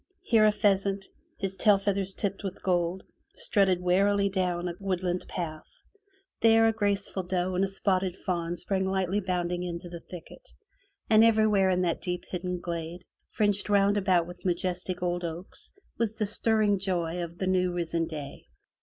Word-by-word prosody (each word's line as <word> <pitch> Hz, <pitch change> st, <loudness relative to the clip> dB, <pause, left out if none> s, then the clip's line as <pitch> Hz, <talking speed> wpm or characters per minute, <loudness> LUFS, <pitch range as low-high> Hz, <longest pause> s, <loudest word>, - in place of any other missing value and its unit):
Here 220 Hz, -2 st, +4 dB
a -, -, +5 dB
pheasant, 200 Hz, -2 st, +1 dB, 0.3 s
his 195 Hz, -1 st, -3 dB
tail 205 Hz, +1 st, +4 dB
feathers 195 Hz, -1 st, -1 dB
tipped 200 Hz, 0 st, -3 dB
with 195 Hz, -1 st, -6 dB
gold, 180 Hz, 0 st, 0 dB, 0.3 s
strutted 190 Hz, -3 st, +2 dB
warily 200 Hz, +3 st, +3 dB
down 180 Hz, -2 st, -1 dB
a 175 Hz, -, -3 dB
woodland 185 Hz, -2 st, -2 dB
path; 155 Hz, -3 st, -5 dB, 0.7 s
there, 225 Hz, 0 st, +5 dB
a 225 Hz, -, +2 dB
graceful 200 Hz, -2 st, 0 dB
doe 180 Hz, 0 st, -1 dB
and 185 Hz, +2 st, +1 dB
a -, -, +2 dB
spotted 190 Hz, -1 st, 0 dB
fawn 175 Hz, -2 st, -2 dB
sprang 190 Hz, +1 st, 0 dB
lightly 190 Hz, +1 st, 0 dB
bounding 180 Hz, -2 st, -2 dB
into 175 Hz, 0 st, -5 dB
the 170 Hz, 0 st, -7 dB
thicket, 180 Hz, -, -12 dB, 0.5 s
and 220 Hz, 0 st, +6 dB
everywhere 215 Hz, -4 st, +4 dB
in 180 Hz, 0 st, +2 dB
that 170 Hz, -2 st, -1 dB
deep 180 Hz, -1 st, -3 dB
hidden 180 Hz, 0 st, -3 dB
glade, 170 Hz, 0 st, -5 dB, 0.2 s
fringed 205 Hz, -1 st, 0 dB
round 200 Hz, 0 st, +4 dB
about 185 Hz, -4 st, +2 dB
with 175 Hz, +1 st, -11 dB
majestic 180 Hz, 0 st, -1 dB
old 175 Hz, 0 st, -1 dB
oaks, 170 Hz, +2 st, -6 dB, 0.3 s
was 225 Hz, -2 st, 0 dB
the 220 Hz, -1 st, -1 dB
stirring 210 Hz, -1 st, +2 dB
joy 175 Hz, -3 st, -1 dB
of 170 Hz, 0 st, -8 dB
the 190 Hz, -, -2 dB
new 185 Hz, -1 st, +2 dB
risen 170 Hz, -1 st, -1 dB
day. 150 Hz, -, -8 dB
185 Hz, 165 wpm, -28 LUFS, 175-200 Hz, 0.7 s, and